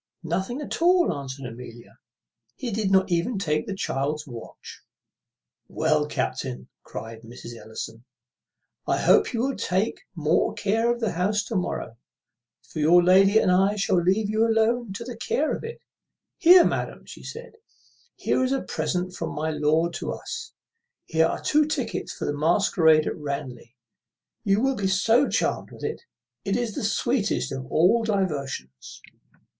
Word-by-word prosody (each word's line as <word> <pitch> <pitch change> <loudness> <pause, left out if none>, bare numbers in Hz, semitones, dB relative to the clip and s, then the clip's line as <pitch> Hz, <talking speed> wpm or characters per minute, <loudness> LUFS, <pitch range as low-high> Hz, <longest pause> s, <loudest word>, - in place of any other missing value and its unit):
"Nothing 190 - -2
at 295 - -5
all," 355 - +4
answered 135 -2 -7
Amelia. 115 -2 -10 0.6
"He 250 -3 -4
did 210 -1 0
not 190 -1 +3
even 175 +7 0
take 155 -5 -1
the 200 - -3
child's 150 -2 -2
watch." 120 -5 -10 0.9
"Well, 155 -1 +1
captain," 65 - -3
cries 115 0 -8
Mrs. 120 0 -10
Ellison, 115 0 -8 0.8
"I - - +2
hope 425 - +4
you 235 -3 -1
will 270 +1 0
take 190 +5 -1
more 155 0 +1
care 225 +4 +1
of 240 0 -3
the 220 -4 0
house 200 +4 0
to 225 - -5
morrow; 180 - -3 0.7
for 155 - -8
your 170 +4 +6
lady 195 +3 +6
and 185 - +4
I 195 +3 +3
shall 195 -3 +2
leave 195 +5 +2
you 215 +2 +1
alone 230 0 +2
to 205 - -6
the 245 0 -7
care 290 +6 0
of - - -8
it. 460 +1 -7 0.6
Here, 355 +1 +8
madam," - - -2
said 470 +2 -9
she, - - -23 0.7
"here - - +3
is 260 - 0
a 270 - 0
present 180 0 -2
from - - -5
my 155 +2 -1
lord 155 +3 +1
to - - -3
us; - - -7 0.5
here 160 0 +2
are - - -3
two 300 0 +3
tickets 270 -6 -3
for - - -5
the 145 - -1
masquerade 160 -1 +3
at - - -2
Ranelagh. 140 -5 -6 0.7
You 200 +2 +2
will 270 +1 +2
be 200 -3 -1
so 225 +8 +3
charmed - - -1
with - - -13
it! - - -3 0.4
It 195 +2 0
is 240 -3 -2
the - - -4
sweetest 220 +1 0
of 130 -1 -6
all 205 +8 +4
diversions." 140 - -3
185 Hz, 160 wpm, -25 LUFS, 150-225 Hz, 0.9 s, Here